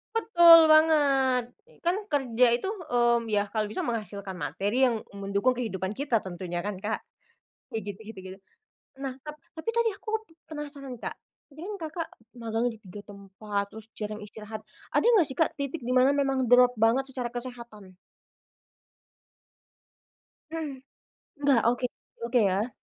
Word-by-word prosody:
Betul 345 Hz, -7 st, +8 dB
banget! 280 Hz, -5 st, +4 dB, 0.4 s
Kan 345 Hz, +2 st, +2 dB
kerja 255 Hz, -4 st, +2 dB
itu, 245 Hz, -, -3 dB
mmm, 240 Hz, -, +1 dB
ya 205 Hz, -2 st, 0 dB
kalau 215 Hz, -1 st, 0 dB
bisa 210 Hz, -, -3 dB
menghasilkan 210 Hz, -4 st, -4 dB
materi 230 Hz, +7 st, +1 dB
yang 230 Hz, -3 st, -2 dB
mendukung 200 Hz, +4 st, 0 dB
kehidupan 205 Hz, -7 st, -3 dB
kita 235 Hz, -1 st, 0 dB
tentunya 175 Hz, -1 st, -5 dB
kan, 200 Hz, -2 st, -4 dB
Kak? 215 Hz, +3 st, -3 dB, 0.7 s
Ya 225 Hz, -, -2 dB
gitu 205 Hz, -2 st, -7 dB
gitu 215 Hz, -2 st, -9 dB
gitu. 190 Hz, 0 st, -9 dB, 0.6 s
Nah, 265 Hz, -2 st, -4 dB
tap 300 Hz, 0 st, -6 dB, 0.2 s
tadi 460 Hz, +7 st, +1 dB
aku 440 Hz, +1 st, -3 dB
pe 390 Hz, -7 st, -24 dB
penasaran, 290 Hz, -3 st, -7 dB
Kak, -, -, -4 dB, 0.4 s
ini 325 Hz, -, -7 dB
kan 420 Hz, -, -5 dB, 0.2 s
Kakak 330 Hz, +1 st, -4 dB, 0.3 s
magang 230 Hz, +1 st, -1 dB
di 225 Hz, -, -8 dB
3 205 Hz, -1 st, -11 dB
tempat, 200 Hz, +1 st, -4 dB
terus 220 Hz, 0 st, -11 dB
jarang 210 Hz, 0 st, -4 dB
istirahat. 215 Hz, +1 st, -8 dB, 0.3 s
Ada -, -, +3 dB
nggak 420 Hz, -8 st, +5 dB
sih, 265 Hz, -, -3 dB
Kak, 325 Hz, -, +3 dB
titik 280 Hz, +1 st, -4 dB
di 250 Hz, +1 st, -2 dB
mana 260 Hz, +2 st, +5 dB
memang 270 Hz, -2 st, +1 dB
drop 245 Hz, 0 st, +5 dB
banget 235 Hz, +5 st, +3 dB
secara 250 Hz, -3 st, -4 dB
kesehatan? 235 Hz, -6 st, -8 dB, 2.5 s
Mmm, 320 Hz, -2 st, -3 dB, 0.7 s
nggak? 275 Hz, -4 st, +4 dB
Oke 245 Hz, +1 st, -1 dB, 0.4 s
oke 245 Hz, +1 st, +2 dB
ya? 210 Hz, +5 st, -1 dB
240 Hz, 145 wpm, -28 LUFS, 210-280 Hz, 2.5 s, Betul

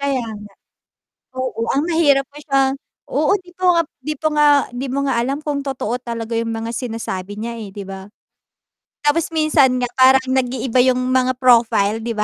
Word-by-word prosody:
Kaya 275 Hz, -2 st, 0 dB
nga. 210 Hz, -2 st, -9 dB, 0.9 s
Oo, 255 Hz, -3 st, -2 dB
ang 280 Hz, -, +1 dB
mahirap 290 Hz, -6 st, +3 dB
pa 290 Hz, -, -14 dB
siya 275 Hz, -2 st, +1 dB, 0.5 s
oo, 300 Hz, +6 st, +1 dB
'di 355 Hz, -1 st, -19 dB
pa 370 Hz, -, -5 dB
nga 340 Hz, -, +3 dB, 0.2 s
'di 305 Hz, 0 st, -2 dB
po 310 Hz, -, -1 dB
nga 295 Hz, 0 st, +5 dB, 0.2 s
'di 245 Hz, +2 st, -5 dB
mo 280 Hz, -, 0 dB
nga 265 Hz, -, +1 dB
alam 270 Hz, +5 st, -1 dB
kung 290 Hz, -2 st, -3 dB
totoo 250 Hz, -3 st, -2 dB
talaga 230 Hz, -2 st, -5 dB
yung 230 Hz, 0 st, -1 dB
mga 225 Hz, +1 st, -4 dB
sinasabi 210 Hz, -4 st, -5 dB
niya, 235 Hz, +1 st, -4 dB
eh, 210 Hz, -4 st, -8 dB
'di 200 Hz, 0 st, -7 dB
ba? 190 Hz, 0 st, -7 dB, 1.0 s
Tapos 320 Hz, +3 st, +1 dB
minsan 300 Hz, -5 st, +3 dB
nga 245 Hz, -, 0 dB
parang 260 Hz, 0 st, +5 dB
nag-iiba 255 Hz, -1 st, +1 dB
yung 255 Hz, 0 st, +2 dB
mga 255 Hz, 0 st, +2 dB
profile 225 Hz, -4 st, +3 dB
'di 235 Hz, -, -3 dB
ba? 210 Hz, -2 st, -1 dB
255 Hz, 185 wpm, -19 LUFS, 230-280 Hz, 1.0 s, nga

